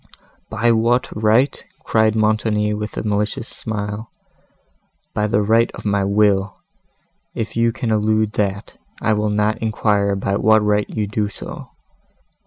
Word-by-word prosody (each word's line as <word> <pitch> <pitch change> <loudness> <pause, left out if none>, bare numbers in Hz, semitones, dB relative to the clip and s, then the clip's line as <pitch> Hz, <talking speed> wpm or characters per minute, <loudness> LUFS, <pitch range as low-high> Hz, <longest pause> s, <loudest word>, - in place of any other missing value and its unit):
"By 115 +2 +1
what 115 +2 +1
right!" 110 +6 +2 0.2
cried 110 -1 +2
Montoni, 110 -1 +1
with 105 0 -5
a - - -2
malicious 105 +2 -1
smile, 105 0 -5 1.0
"by 105 0 0
the 105 0 +1
right 115 +3 +3
of - - -10
my 100 -1 +1
will; 100 -1 +2 0.8
if 115 -1 -4
you 115 0 +2
can 115 0 -3
elude 110 0 +1
that, 100 -1 -3 0.2
I 110 - +1
will 105 0 0
not 105 +1 0
inquire 105 -2 +1
by 100 0 -1
what 110 0 +4
right 105 0 +1
you 110 -2 -2
do 105 0 -2
so. 105 - -8
105 Hz, 145 wpm, -20 LUFS, 105-110 Hz, 1.0 s, what